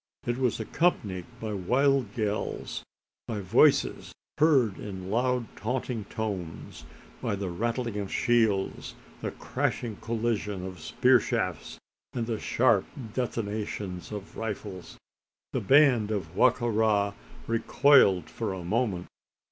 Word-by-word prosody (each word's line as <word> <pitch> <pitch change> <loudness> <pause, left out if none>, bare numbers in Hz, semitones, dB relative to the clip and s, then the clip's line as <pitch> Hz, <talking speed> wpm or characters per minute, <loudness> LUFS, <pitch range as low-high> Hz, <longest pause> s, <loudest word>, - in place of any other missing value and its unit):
It 120 +1 -1
was 125 -4 +1
accompanied 105 - 0
by 110 -1 -4
wild 125 +4 +1
yells 105 -2 -2 0.5
by 110 -3 -3
voices 115 +10 +3 0.3
heard 135 -10 +4
in 95 -2 -6
loud 125 +1 +1
taunting 120 -1 -3
tones 100 -8 -5 0.4
by - - -1
the 100 -1 -3
rattling 115 +3 -2
of 100 -1 -4
shields, 115 -5 +1 0.3
the - - -2
crashing 115 -4 -2
collision 110 -4 -2
of 95 -2 -7
spear 125 +10 +4
shafts, - - -2 0.4
and 120 -2 -1
the 115 -2 -2
sharp 115 -5 +3 0.3
detonations 105 -6 -3
of 105 -1 -7
rifles. 100 -4 -5 0.6
The - - 0
band 125 -2 +5
of 95 -7 -3
Wa 130 - +6
ka 120 0 -5
ra 105 -3 +2 0.3
recoiled 115 - +4
for - - -3
a 95 -2 -6
moment. 100 -1 0
110 Hz, 125 wpm, -28 LUFS, 100-120 Hz, 0.6 s, Wa